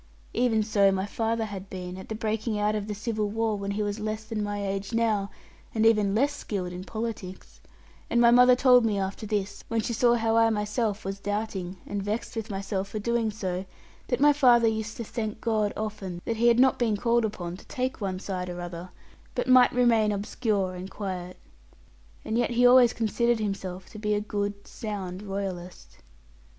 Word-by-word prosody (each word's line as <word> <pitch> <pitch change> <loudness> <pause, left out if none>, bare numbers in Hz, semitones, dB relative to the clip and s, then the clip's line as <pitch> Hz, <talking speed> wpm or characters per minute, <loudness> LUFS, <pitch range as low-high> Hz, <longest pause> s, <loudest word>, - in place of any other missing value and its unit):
Even 230 -2 +2
so 200 -2 +3
my 190 0 -1
father 225 +2 -1
had 195 -2 -7
been, 180 -1 -6
at 190 - -10
the 220 - -3
breaking 220 0 -2
out 210 +1 +1
of 210 -1 -3
the 210 - -3
civil 215 0 -2
war, 220 0 0
when 200 -1 -4
he 205 +1 -1
was 205 +1 -3
less 215 0 -3
than 215 -1 -4
my 205 -1 -2
age 195 +2 -3
now, 220 -3 +1 0.5
and 220 0 +2
even 210 -3 +4
less 280 +6 +2
skilled 185 -8 -4
in 180 +1 -6
politics; 215 -4 -6 0.5
and 235 - +2
my 235 0 +6
mother 250 +1 +7
told 250 -1 +6
me 215 -3 +1
after 195 +3 -3
this, 200 -1 -2
when 230 - 0
she 230 +2 -2
saw 240 +1 +4
how 225 -1 +1
I 225 0 +5
myself 210 0 -1
was 195 +1 -4
doubting, 200 -3 -3
and 200 0 -3
vexed 215 +5 -3
with 225 -1 -4
myself 195 -1 -3
for 200 - -6
doing 230 +1 0
so, 190 -3 -3 0.4
that 245 - 0
my 295 +1 +6
father 245 -5 +5
used 220 0 -2
to 235 - -4
thank 220 -1 -4
God 215 -3 0
often 205 -5 -4
that 230 - -2
he 235 +2 +3
had 235 0 +5
not 260 0 +4
been 225 -4 +1
called 235 +2 +2
upon 180 -5 -3
to - - -15
take 255 -2 -3
one 190 -2 -2
side 185 -2 -4
or 175 0 -6
other, 175 0 -6 0.5
but - - 0
might 255 -1 +7
remain 230 -4 +3
obscure 200 -1 -1
and 180 +1 -7
quiet. 185 -3 -5 0.9
And 225 +2 0
yet 240 - +1
he 245 +1 +3
always 245 -1 +7
considered 235 +2 +1
himself 190 -3 -4
to 215 - -10
be 210 0 0
a - - +1
good, 205 -1 -3
sound 195 -4 -5
Royalist. 185 - -6
210 Hz, 200 wpm, -27 LUFS, 195-230 Hz, 0.9 s, mother